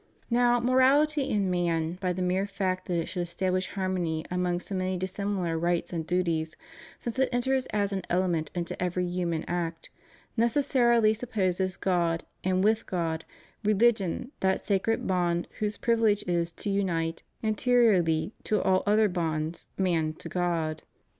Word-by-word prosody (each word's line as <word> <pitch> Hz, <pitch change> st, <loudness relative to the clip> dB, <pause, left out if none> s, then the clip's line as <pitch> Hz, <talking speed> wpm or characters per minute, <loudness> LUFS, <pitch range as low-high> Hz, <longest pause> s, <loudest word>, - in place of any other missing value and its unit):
Now, 240 Hz, 0 st, +4 dB
morality, 270 Hz, +4 st, +3 dB
in 200 Hz, -3 st, +1 dB
man, 170 Hz, -1 st, 0 dB
by 180 Hz, -2 st, +1 dB
the 180 Hz, +1 st, -2 dB
mere 185 Hz, +2 st, +1 dB
fact 190 Hz, -2 st, -2 dB
that 175 Hz, -, 0 dB
it 165 Hz, -, -1 dB
should 180 Hz, -, -3 dB
establish 185 Hz, +2 st, -1 dB
harmony 180 Hz, -5 st, -2 dB
among 180 Hz, -1 st, 0 dB
so 195 Hz, -, -7 dB
many 185 Hz, 0 st, -1 dB
dissimilar 185 Hz, -2 st, -2 dB
rights 175 Hz, +1 st, 0 dB
and 160 Hz, -2 st, -3 dB
duties, 165 Hz, -3 st, 0 dB, 0.4 s
since 235 Hz, +2 st, -5 dB
it 265 Hz, -, +3 dB
enters 260 Hz, +1 st, +1 dB
as 200 Hz, -1 st, -1 dB
an 190 Hz, -, -1 dB
element 175 Hz, -3 st, +1 dB
into 170 Hz, -1 st, -2 dB
every 180 Hz, 0 st, 0 dB
human 175 Hz, -2 st, -1 dB
act, 170 Hz, -1 st, -3 dB, 0.4 s
necessarily 235 Hz, -2 st, +3 dB
supposes 190 Hz, -5 st, -1 dB
God, 170 Hz, -3 st, 0 dB, 0.2 s
and 185 Hz, 0 st, +1 dB
with 220 Hz, +2 st, +2 dB
God, 165 Hz, -3 st, -2 dB, 0.4 s
religion, 215 Hz, +1 st, +2 dB
that 190 Hz, 0 st, 0 dB
sacred 205 Hz, +2 st, +1 dB
bond 175 Hz, -2 st, 0 dB
whose 210 Hz, -1 st, -1 dB
privilege 225 Hz, -3 st, +2 dB
is 170 Hz, -1 st, 0 dB
to 205 Hz, -, -4 dB
unite, 170 Hz, -4 st, -1 dB, 0.2 s
anteriorly 215 Hz, -6 st, +3 dB
to 210 Hz, -, +1 dB
all 185 Hz, 0 st, +2 dB
other 215 Hz, +1 st, +4 dB
bonds, 165 Hz, -3 st, -2 dB
man 165 Hz, -5 st, +1 dB
to -, -, -9 dB
God. 165 Hz, -3 st, -1 dB
185 Hz, 150 wpm, -28 LUFS, 170-215 Hz, 0.4 s, Now